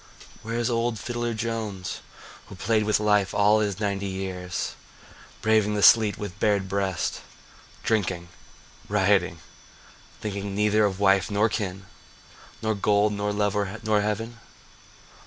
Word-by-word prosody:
Where 115 +1 -5
is 120 -1 0
Old 115 0 0
Fiddler 120 +2 -3
Jones 110 -5 -4 0.5
Who - - -10
played 110 -1 +1
with 105 0 +2
life 105 -2 +2
all 105 +1 +4
his 100 -2 -1
ninety 100 -1 -1
years, 95 -2 -4 0.7
Braving 110 -1 +3
the 105 - 0
sleet 110 -3 +6
with 100 -2 -7
bared 100 -3 +2
breast, 95 -2 -2 0.6
Drinking, 90 -6 -1 0.6
rioting, 95 -4 +2 0.8
thinking 100 -1 -4
neither 105 +1 +3
of 95 -1 -2
wife 100 -2 +3
nor 105 +2 +2
kin, 95 -3 -4 0.8
Nor 110 0 +1
gold, 105 +1 +2
nor 105 0 -1
love, 105 0 -1
nor 110 -1 +2
heaven? 115 +3 -3
105 Hz, 130 wpm, -25 LUFS, 95-110 Hz, 0.8 s, sleet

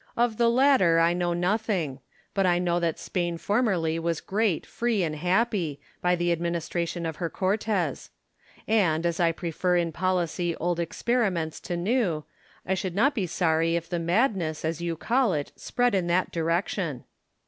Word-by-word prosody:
Of 235 -2 +1
the 235 -1 +4
latter 235 -10 +4
I 165 +1 +4
know 175 0 0
nothing; 180 - -1 0.3
but 195 -2 +2
I 175 -1 +3
know 175 -1 +1
that 170 -2 -1
Spain 175 -2 -2
formerly 185 -6 +1
was 165 -1 -1
great, 205 -4 0
free, 230 -5 0
and 155 -2 -2
happy, 180 -2 0 0.2
by 180 0 +3
the 175 0 +1
adminis 170 0 -2
tration 170 -1 -2
of 160 - -5
her 170 -2 -2
Cortes: 190 -5 -1 0.6
and, 175 -7 +2
as 170 -1 0
I 170 -1 +4
prefer 175 +2 -1
in 170 -1 0
policy 175 -1 -1
old 175 0 -1
experiments 175 -2 -1
to 175 - -4
new, 180 -5 0 0.4
I 190 - 0
should 185 -1 -3
not 275 +8 +3
be 200 -8 -1
sorry 165 -1 +1
if 170 -1 -2
the 175 - -1
madness, 170 - 0
as 160 +1 -2
you 170 -1 -2
call 235 +3 +2
it, 145 -2 -3
spread 245 -2 0
in 185 -3 +1
that 180 +2 +1
direction. 165 - -1
175 Hz, 170 wpm, -26 LUFS, 165-200 Hz, 0.6 s, the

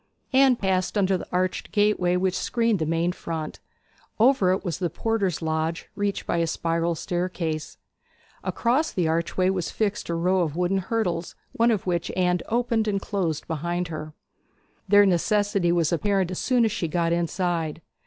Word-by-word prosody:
Anne 265 -1 +6
passed 190 -2 0
under 195 -1 +3
the 180 - -5
arched 185 +1 -1
gateway 205 -4 +2
which 185 0 +1
screened 230 -4 +1
the 160 - -1
main 165 +2 +1
front; 160 -3 -5 0.6
over 225 -6 +4
it 190 +2 -1
was 175 -1 -2
the 175 -3 0
porter's 200 -7 -1
lodge, 160 +1 -2
reached 205 -1 -2
by - - 0
a 165 0 +1
spiral 165 +1 0
staircase. 175 -2 -3 0.7
Across 265 +7 0
the 175 -3 +1
archway 170 +3 +1
was 185 -3 -2
fixed 210 -4 -2
a 170 - 0
row 180 +3 +2
of 160 -3 -1
wooden 180 +2 +1
hurdles, 185 -4 -2 0.2
one 230 +1 +2
of 215 -5 0
which 175 -2 -1
Anne 180 -1 +2
opened 230 -1 +1
and 200 -2 +1
closed 180 -7 -2
behind 170 +2 -2
her. 155 -1 -6 0.7
Their 205 +1 +6
necessity 200 0 +2
was 170 -1 +2
apparent 195 0 +1
as 185 - -3
soon 250 -3 +2
as 220 - +1
she 190 -6 -2
got 170 +1 0
inside. 170 -2 -1
180 Hz, 170 wpm, -25 LUFS, 170-205 Hz, 0.7 s, Anne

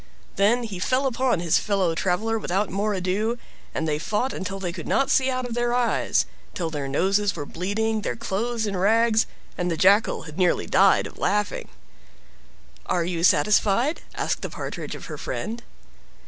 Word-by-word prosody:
Then 230 +5 +3
he 205 -6 -5
fell 255 +8 +1
upon 255 -5 +1
his 170 -2 +3
fellow 195 -5 +1
traveler 210 +6 0
without 195 -1 -1
more 205 +2 0
ado, 200 +6 -1 0.3
and 160 - -2
they 150 -1 0
fought 220 +10 -1
until 195 +1 -4
they 180 -3 -3
could 170 -4 -7
not 275 0 +2
see 265 -1 +3
out 255 -1 -1
of 245 - -5
their 240 0 0
eyes, 245 -1 +2 0.3
till 165 -3 -2
their 145 -3 -3
noses 195 +8 +1
were 145 - -4
bleeding, 215 +7 -1
their - - -2
clothes 230 +1 -2
in 200 -2 -2
rags, 225 +4 +3 0.3
and 180 0 0
the 165 - -1
Jackal 200 +5 +4
had 155 +2 -9
nearly 180 -2 +2
died - - +4
of - - -10
laughing. 210 0 0 1.2
"Are 170 -2 +1
you 170 -1 -2
satisfied?" 210 - +3
asked - - -1
the - - -4
Partridge - - -6
of - - -9
her - - -7
friend. 230 +2 -4
205 Hz, 175 wpm, -24 LUFS, 180-230 Hz, 1.2 s, Jackal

